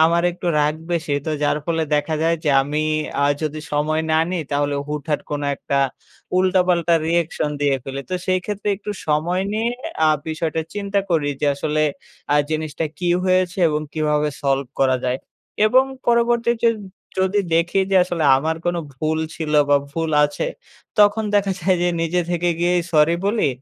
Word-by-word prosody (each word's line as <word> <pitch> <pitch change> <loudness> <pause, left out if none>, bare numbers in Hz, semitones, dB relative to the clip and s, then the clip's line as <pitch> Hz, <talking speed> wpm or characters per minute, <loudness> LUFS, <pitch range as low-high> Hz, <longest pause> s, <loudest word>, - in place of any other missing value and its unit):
আমার 170 +1 +3
একটু 175 0 -7
রাগ 150 0 +2 0.2
বেশি। 160 -3 -1
তো 155 - 0
যার 145 0 +2
ফলে 165 -1 0
দেখা 150 +2 0
যায় 165 +1 +2
যে 150 - +3
আমি 150 +2 -2 0.4
আ - - +4 0.2
যদি 155 0 -3
সময় 155 +2 +1
না 155 - +4
নিই, 180 -2 -1
তাহলে 145 0 0
হুটহাট 150 0 -2
কোন 145 -1 -2 0.2
একটা 140 - -1 0.6
উল্টা-পাল্টা 180 -2 +3
রিঅ্যাকশন 165 -2 0
দিয়ে 140 -2 +2
ফেলি। 135 0 -5
তো - - 0
সেই 185 0 +2
ক্ষেত্রে 210 0 -3
একটু 210 +1 -6 0.2
সময় 165 +5 +1
নিয়ে 220 +2 0 0.4
আ - - +5 0.2
বিষয়টা 160 0 -2
চিন্তা 200 0 -1
করি 150 -4 +2
যে - - +1
আসলে 150 +2 -1 0.5
আ - - +5
জিনিসটা 155 0 -2
কী 180 - -1 0.2
হয়েছে 185 0 +1
এবং 150 -1 -1
কীভাবে 150 -1 +1
সলভ 135 0 +1
করা 130 -1 +4
যায়। 125 +1 0 0.5
এবং 255 +4 +5 0.2
পরবর্তীতে 235 0 +2 0.5
যদি 190 +2 +2
দেখি 170 +4 +2
যে 195 - +4
আসলে 175 -3 -2
আমার 160 +4 -1
কোনো 175 0 +1 0.2
ভুল 155 +3 -1 0.2
ছিল 155 -2 -3 0.2
বা 145 - +7
ভুল 165 +2 -2
আছে, 145 - -2 0.5
তখন 210 +1 +5
দেখা 200 -1 +2
যায় 185 +2 +2
যে 175 - +2
নিজে 165 +2 +1
থেকে 175 0 0
গিয়েই 175 0 +2
সরি 155 +1 +4
বলি। 210 -5 +2
165 Hz, 170 wpm, -21 LUFS, 150-185 Hz, 0.6 s, বা